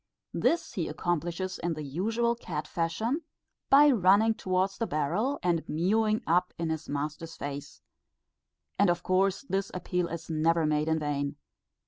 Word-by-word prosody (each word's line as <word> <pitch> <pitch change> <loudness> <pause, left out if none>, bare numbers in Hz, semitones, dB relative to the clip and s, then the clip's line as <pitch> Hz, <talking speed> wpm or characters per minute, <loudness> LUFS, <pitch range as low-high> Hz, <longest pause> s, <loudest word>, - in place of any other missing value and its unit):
This 335 - +1
he 170 -4 -2
accomplishes 175 +3 -2
in 170 -1 -1
the 155 - -5
usual 220 - 0
cat 150 -10 -5
fashion, 220 - -1 0.5
by 290 +1 +7
running 210 0 +4
towards 190 -1 -1
the 230 - 0
barrel 180 - 0
and 170 -2 +2
mewing 215 +7 +1
up 180 +2 +1
in 165 -1 -1
his 160 0 -4
master's 150 +3 -4
face; 145 0 -7 1.0
and 200 -2 +5
of 175 0 0
course 190 +4 +1
this 195 -6 -2
appeal 180 0 -1
is 170 -1 -6
never 165 +1 +2
made 150 0 +1
in 160 0 +2
vain. 145 -1 -2
175 Hz, 150 wpm, -29 LUFS, 155-200 Hz, 1.0 s, by